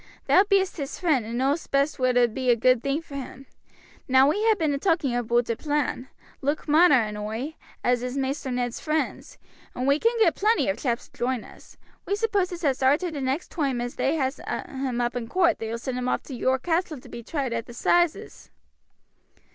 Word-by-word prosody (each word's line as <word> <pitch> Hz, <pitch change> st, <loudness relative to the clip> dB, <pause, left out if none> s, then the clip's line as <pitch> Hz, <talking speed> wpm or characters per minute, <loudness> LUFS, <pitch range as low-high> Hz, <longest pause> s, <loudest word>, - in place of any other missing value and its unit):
Thou 375 Hz, -, +6 dB
bee'st 390 Hz, -2 st, +1 dB
his 280 Hz, -2 st, -5 dB
friend 295 Hz, -, +1 dB
and 235 Hz, +1 st, -4 dB
know'st 275 Hz, +5 st, 0 dB
best 280 Hz, +1 st, +1 dB
what 255 Hz, -1 st, +2 dB
'ould 240 Hz, -2 st, +3 dB
be 260 Hz, 0 st, -1 dB
a 240 Hz, -, +6 dB
good 255 Hz, +1 st, +3 dB
thing 280 Hz, +4 st, -1 dB
for 310 Hz, -, -14 dB
him. 270 Hz, -1 st, -7 dB, 0.6 s
Now 265 Hz, +1 st, +5 dB
we 300 Hz, -, +2 dB
ha' 440 Hz, -2 st, +4 dB
been 310 Hz, -4 st, +1 dB
a 280 Hz, -, -2 dB
talking 325 Hz, -7 st, +1 dB
aboot 240 Hz, 0 st, +1 dB
a -, -, -1 dB
plan, 290 Hz, -2 st, -2 dB, 0.3 s
Luke 290 Hz, +4 st, -2 dB
Marner 310 Hz, 0 st, +6 dB
and 210 Hz, -1 st, -5 dB
oi, 220 Hz, +8 st, -4 dB, 0.3 s
as 245 Hz, -1 st, +2 dB
is 250 Hz, +2 st, -4 dB
Maister 270 Hz, 0 st, -2 dB
Ned's 245 Hz, -1 st, -2 dB
friends, 310 Hz, 0 st, -3 dB, 0.4 s
and 250 Hz, -, -2 dB
we 280 Hz, +2 st, +3 dB
can 465 Hz, +4 st, +2 dB
get 425 Hz, -8 st, +4 dB
plenty 435 Hz, -, +2 dB
of 195 Hz, -, -1 dB
chaps 240 Hz, -3 st, -2 dB
to -, -, -22 dB
join 250 Hz, -1 st, -1 dB
us. -, -, -16 dB, 0.3 s
We 400 Hz, -, +1 dB
supposes 390 Hz, -5 st, -1 dB
as 270 Hz, -4 st, +1 dB
arter 290 Hz, +7 st, +2 dB
the 290 Hz, -3 st, -5 dB
next 265 Hz, +5 st, -2 dB
toime 275 Hz, -6 st, -1 dB
as 245 Hz, 0 st, -3 dB
they 280 Hz, -, 0 dB
has 265 Hz, -3 st, -1 dB
him 260 Hz, -3 st, -3 dB
up 240 Hz, +1 st, -1 dB
in 240 Hz, -2 st, -3 dB
coort 350 Hz, -2 st, +2 dB
they 225 Hz, -, -4 dB
will 230 Hz, -, -3 dB
send 250 Hz, +1 st, -4 dB
him 250 Hz, 0 st, -1 dB
off -, -, -1 dB
to 275 Hz, -, -9 dB
York 260 Hz, +2 st, 0 dB
Castle 330 Hz, -3 st, -1 dB
to -, -, -15 dB
be 235 Hz, -, -8 dB
tried 265 Hz, 0 st, -3 dB
at 230 Hz, -1 st, -3 dB
the 240 Hz, -, -10 dB
'sizes." 345 Hz, +5 st, 0 dB
270 Hz, 220 wpm, -25 LUFS, 245-315 Hz, 0.6 s, Thou